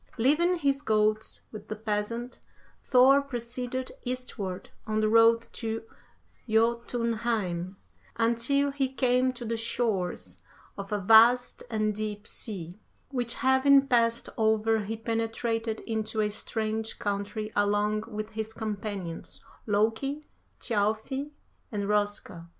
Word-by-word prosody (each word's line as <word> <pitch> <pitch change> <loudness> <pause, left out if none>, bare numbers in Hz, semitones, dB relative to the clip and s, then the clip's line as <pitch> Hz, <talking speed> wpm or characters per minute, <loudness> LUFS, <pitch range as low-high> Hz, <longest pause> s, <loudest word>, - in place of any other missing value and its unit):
'Leaving 305 +9 +3
his 280 -4 +1
goats 215 -2 +1
with 215 -1 -9
the 215 - -4
peasant, 220 +3 -3 0.4
Thor 265 +2 +6
proceeded 250 -1 -4
eastward 235 -7 -5 0.2
on 215 0 0
the 215 - +2
road 230 +1 +5
to 225 -1 -4 0.7
Jotunheim, 225 -5 0 0.4
until 235 +5 +2
he 270 -2 -1
came 255 -1 +2
to 240 -1 -8
the 230 0 -1
shores 225 -5 -2 0.3
of 200 0 -7
a 210 - +1
vast 225 +5 +5
and 215 -1 0
deep 210 0 -4
sea, 185 -5 -6 0.3
which 245 -3 -2
having 270 +1 +5
passed 235 -3 +2
over 220 0 +3
he 215 +2 -4
penetrated 225 0 -2
into 220 -1 -3
a 210 0 +1
strange 220 +1 -2
country 205 +1 -3
along 205 +1 +1
with 215 -1 -5
his 220 0 -4
companions, 205 -6 -5 0.2
Loki, 225 +8 0 0.3
Thjalfi, 220 +6 -1 0.4
and 205 -2 -2
Roska. 205 -5 -1
225 Hz, 115 wpm, -28 LUFS, 210-245 Hz, 0.7 s, Thor